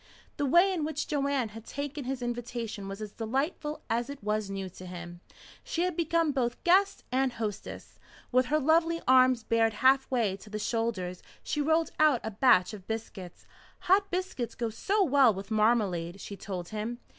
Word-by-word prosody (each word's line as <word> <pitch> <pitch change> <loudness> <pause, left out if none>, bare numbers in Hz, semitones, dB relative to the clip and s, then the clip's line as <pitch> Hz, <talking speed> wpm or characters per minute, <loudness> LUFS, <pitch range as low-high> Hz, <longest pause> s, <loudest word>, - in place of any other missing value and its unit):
The 290 -2 0
way 350 +7 +5
in 335 -4 -2
which 305 -1 -2
Joanne 280 -5 0
had 225 +1 -10
taken 285 +2 -5
his 260 -1 -3
invitation 240 -4 -4
was 195 +2 -6
as 210 - -7
delightful 275 - -3
as 235 +3 -1
it 280 -5 -8
was 210 -1 -1
new 195 -1 -4
to 185 0 -11
him. 175 -1 -8 0.4
She 340 - -1
had 365 -2 -1
become 330 -1 +1
both 240 -3 -2
guest 390 +3 +3
and 260 0 +1
hostess. 215 -4 -6 0.3
With 255 0 +3
her 305 - +2
lovely 330 +3 +2
arms 255 -2 +5
bared 225 -1 +2
halfway 255 -4 +2
to 210 - -14
the 215 - -4
shoulders 210 -5 -2 0.2
she 295 - -1
rolled 320 +2 +2
out 305 -5 +5
a 220 - -3
batch 210 -4 +4
of 195 -3 -10
biscuits. 210 -5 -6 0.4
"Hot 390 +2 +3
biscuits 360 -10 -3
go 230 -2 -2
so 395 - +1
well 270 - +4
with 195 +3 -8
marmalade," 205 -5 +1
she 200 - -7
told 185 -3 -6
him. 215 +3 -4
240 Hz, 180 wpm, -29 LUFS, 210-290 Hz, 0.4 s, way